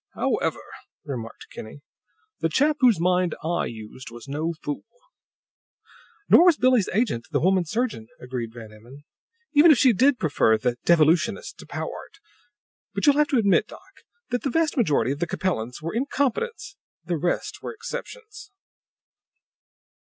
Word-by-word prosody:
"However," - - -1 0.4
remarked 115 -5 -7
Kinney, 110 +6 -10 0.6
"the 165 - 0
chap 295 - +2
whose 240 - +4
mind 180 0 +1
I 170 +2 -1
used 110 +3 -9
was 120 -1 -12
no 155 +4 -3
fool." 145 - -4 1.4
"Nor 345 - +7
was 345 -4 +5
Billie's 250 -5 +3
agent, 185 - -1
the 145 -3 0
woman 185 +1 +2
surgeon," 220 - -2
agreed 125 -3 -5
Van 110 -2 -11
Emmon, 120 +7 -15 0.5
"even 300 +3 +7
if 300 - +7
she 255 -1 +5
did 260 +5 +3
prefer 145 - +2
'the 120 +2 -1
Devolutionist' 170 - +2
to - - -12
Powart. - - -7 0.8
But - - 0
you'll 290 -1 +5
have 300 0 +4
to 275 - +1
admit, 200 -4 +3
doc, - - -16 0.3
that 245 - 0
the 275 - -1
vast 325 +2 +1
majority 145 - +2
of 140 - -4
the 175 - -1
Capellans 125 -8 -3
were 165 - -4
incompetents; 280 - -2 0.3
the 175 -2 -1
rest 175 +4 -2
were - - -5
exceptions." 435 -1 -8
175 Hz, 150 wpm, -24 LUFS, -, 1.4 s, Nor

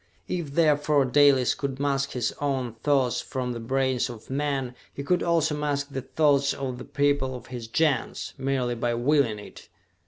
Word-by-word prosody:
If, 160 -6 -4
therefore, 150 -3 +3
Dalis 135 -1 +4
could 135 -2 -4
mask 140 -1 0
his 120 -3 -1
own 135 -5 -1
thoughts 135 -4 +2
from 125 -2 -3
the 120 - -5
brains 130 +1 0
of 120 +1 -10
men, 135 -3 -1 0.2
he 140 - -6
could 180 +5 +1
also 165 -3 +2
mask 145 -1 -2
the 135 - -3
thoughts 140 +1 +2
of 130 -3 -4
the - - -8
people 145 -2 0
of 120 -1 -9
his 120 -2 -6
Gens, 150 +3 0
merely 130 -2 -1
by 120 0 -1
willing 125 -2 +2
it! 105 - -12
135 Hz, 175 wpm, -26 LUFS, 125-145 Hz, 0.2 s, Dalis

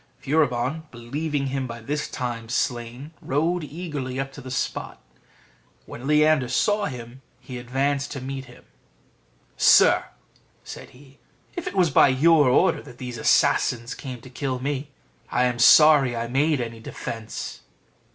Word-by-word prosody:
Furibon, 145 +1 0
believing 140 +5 -3
him 135 -1 -2
by 115 0 -7
this 150 +6 -3
time 120 -3 -5
slain, 125 +3 -3
rode 160 +5 0
eagerly 150 -5 -5
up 135 0 -3
to 140 - -10
the 130 - -9
spot. 125 - -4 0.9
When 125 +3 -8
Leander 150 -3 +3
saw 205 +10 +1
him, 125 -3 -8 0.2
he 125 -2 -8
advanced 135 +3 -1
to 140 - -5
meet 135 +1 -6
him. 120 -1 -17 0.9
"Sir," - - +5 0.6
said - - -10
he, 135 +1 -19 0.4
"if 350 - -5
it - - -5
was 175 -4 +3
by - - +6
your 145 +1 +4
order 175 +9 +3
that 125 -4 -14
these 125 -2 -7
assassins 120 +1 +2
came 130 -4 -8
to 130 - -13
kill 130 0 -3
me, 140 +2 -3 0.4
I - - +1
am 125 -1 0
sorry 145 -1 +6
I 115 0 -2
made 145 +4 +1
any 115 -1 -6
defence." 110 0 -7
135 Hz, 150 wpm, -24 LUFS, 125-150 Hz, 0.9 s, by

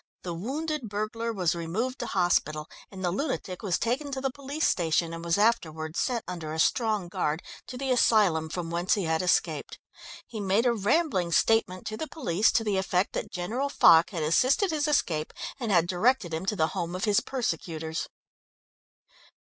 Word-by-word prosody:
The 175 - -4
wounded 270 - -3
burglar 215 +3 -3
was 185 -6 0
removed 195 +10 -3
to - - -3
hospital 155 -4 +1 0.2
and 190 -2 -6
the 175 - +1
lunatic 195 - -3
was 195 -5 0
taken 275 +5 -1
to 265 - -2
the 270 0 -1
police 280 +3 -3
station 165 -1 +1
and 165 0 -6
was 170 +1 +1
afterwards 160 -7 0
sent 245 -3 -1
under 170 -4 -5
a - - -4
strong 215 -1 +1
guard 175 -3 -2 0.2
to 250 - -7
the 265 0 -2
asylum 200 -10 +3
from 165 0 -4
whence 175 +2 +1
he 200 - -2
had 160 -1 0
escaped. 180 0 0 0.5
He 220 - -7
made 200 +4 +1
a 240 - +4
rambling 210 - +1
statement 195 -3 +2
to 215 - -4
the 315 - -4
police 210 - +1
to 225 - +2
the 205 -3 0
effect 190 0 0
that - - -3
General 230 +11 -2
Foch 170 -10 +6
had 170 -6 -3
assisted 260 - +3
his 305 -1 0
escape 165 - 0 0.3
and 230 -4 -2
had 170 -3 +4
directed 185 +1 +1
him 165 +4 -3
to 210 - +1
the 160 -4 +1
home 175 0 -3
of 185 - -4
his 205 -2 +4
persecutors." 165 - -3
195 Hz, 185 wpm, -27 LUFS, 170-240 Hz, 0.5 s, Foch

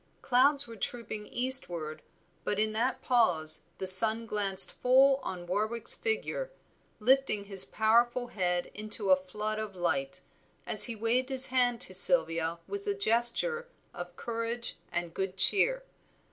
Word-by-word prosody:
Clouds 280 +3 +1
were 230 -1 -12
trooping 220 -1 -7
eastward, 175 -12 +2 0.4
but 205 - -3
in 215 0 +1
that 250 +4 -3
pause 180 -11 +1
the - - -6
sun 220 +5 +7
glanced 200 -3 +2
full 265 +2 +2
on 185 -9 -8
Warwick's 215 +5 -2
figure, 480 +2 -4 0.5
lifting 250 -2 0
his 195 -2 +3
powerful 240 +3 0
head 180 -2 -3
into 210 -2 -3
a - - +7
flood 210 +4 -6
of 215 -3 -8
light, 135 -6 -4 0.4
as - - +6
he 235 - -6
waved 235 +4 -2
his 265 -1 +4
hand 245 -2 -1
to 185 - +4
Sylvia 170 -6 +2
with 405 +1 -8
a 405 - -2
gesture 400 - +1 0.3
of 175 0 -10
courage 230 +2 -6
and 175 -1 -5
good 190 0 -5
cheer. - - +2
225 Hz, 145 wpm, -28 LUFS, 190-255 Hz, 0.5 s, sun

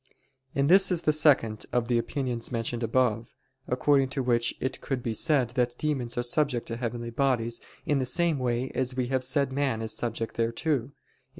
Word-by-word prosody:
And 140 0 +2
this 190 +4 +6
is 175 -2 0
the 155 - +3
second 135 -8 +2
of 120 -1 0
the 120 -1 +2
opinions 125 -1 -3
mentioned 115 0 -2
above: 115 -1 +1 0.4
according 135 +1 +2
to 135 0 -2
which 120 -1 +1
it 130 - -3
could 130 -3 -3
be 115 - -1
said 135 -1 +2
that 125 -1 0
demons 135 -7 -2
are 120 - +1
subject 125 -1 0
to 115 - -3
heavenly 120 -1 -4
bodies 120 -2 0 0.2
in 145 -3 +1
the 130 - 0
same 165 +2 +2
way 125 +1 -1
as 130 -1 -1
we 125 -1 -1
have 130 -1 0
said 135 +1 0
man 135 -5 0
is 110 -1 -3
subject 115 0 -3
thereto 115 +3 0
(A. - - -18
125 Hz, 195 wpm, -27 LUFS, 115-140 Hz, 0.4 s, this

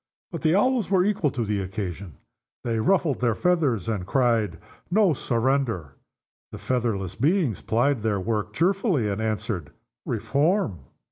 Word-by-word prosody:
But - - -5
the 160 +2 +3
Owls 245 +2 +2
were 190 -2 +3
equal 200 -7 +1
to 120 -3 -3
the 105 -1 -1
occasion. 95 - -5 0.5
They 115 -2 -1
ruffled 155 - +1
their 120 -3 +2
feathers, 150 - +1
and 105 -5 -1
cried, 115 -4 +1 0.3
"No 195 -2 +4
surrender!" 120 - -1 0.6
The - - -7
featherless 110 -7 -1
beings 145 - +1
plied 120 +2 +1
their 105 -2 0
work 105 +1 -2
cheerfully, 180 - +1
and 100 +1 -2
answered, 110 -6 -2 0.4
"Reform!" 145 - 0
120 Hz, 140 wpm, -25 LUFS, 105-165 Hz, 0.6 s, No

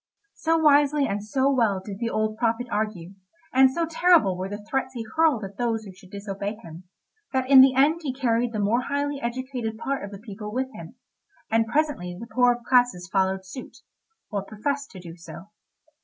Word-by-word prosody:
So 325 0 +1
wisely 295 -2 +4
and 205 -4 -3
so 265 +5 +1
well 225 -7 +2
did 195 +1 -8
the 235 - -1
old 215 -1 -1
prophet 230 +1 0
argue, 205 -5 -3 0.4
and 265 0 +6
so 330 +6 -1
terrible 325 - +3
were 185 +1 -4
the 205 +1 -7
threats 265 0 -2
he 235 - -4
hurled 315 -9 +3
at 195 0 -8
those 230 -2 -1
who 200 - -10
should 190 0 -18
disobey 200 +1 -5
him, 175 -5 -12 0.5
that 260 -1 0
in 270 -1 +9
the 260 -1 +6
end 295 +5 +4
he 290 -5 -2
carried 245 -2 0
the 220 - -4
more 210 +4 +1
highly 285 +1 -2
educated 240 -2 -4
part 275 +2 -3
of 200 - -6
the 200 - -9
people 210 0 -8
with 260 +3 -3
him, - - -10 0.6
and 225 0 +2
presently 230 - -1
the 230 - -7
poorer 245 +1 +2
classes 245 -8 +3
followed 190 -1 +1
suit, 220 +7 -9 0.5
or 205 -2 -1
professed 275 +8 -3
to 190 - -11
do 170 -2 -10
so. 170 +2 -11
230 Hz, 195 wpm, -25 LUFS, 200-265 Hz, 0.6 s, in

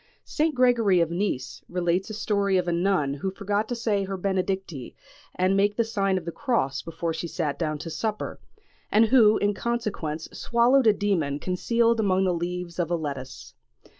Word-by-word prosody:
St. 310 -1 0
Gregory 235 -7 +4
of 170 -1 +1
Nice 175 -7 -2
relates 180 +2 0
a 215 - -5
story 200 -2 +1
of 180 -1 0
a - - +1
nun 170 -5 +1
who 145 +7 -3
forgot 205 +2 -2
to 245 - -1
say 215 -4 0
her 195 0 -4
benedicite 190 -7 -3 0.4
and 185 +1 +2
make 205 +1 +2
the 230 - +2
sign 200 -4 0
of 175 - -5
the 170 - -3
cross 225 - -1
before 165 0 -4
she 170 - -4
sat 155 -4 -3
down 155 -3 -1
to 160 +3 -7
supper, 215 +4 -3 0.5
and 215 +2 +5
who 220 -3 +5
in 205 0 +1
consequence 200 -9 -3
swallowed 240 +2 +3
a 215 - +7
demon 180 -9 0
concealed 230 +8 +1
among 190 -3 +2
the 185 -1 +2
leaves 175 0 -4
of 170 -2 0
a 175 - +1
lettuce. 140 -5 -6
190 Hz, 185 wpm, -25 LUFS, 170-215 Hz, 0.5 s, a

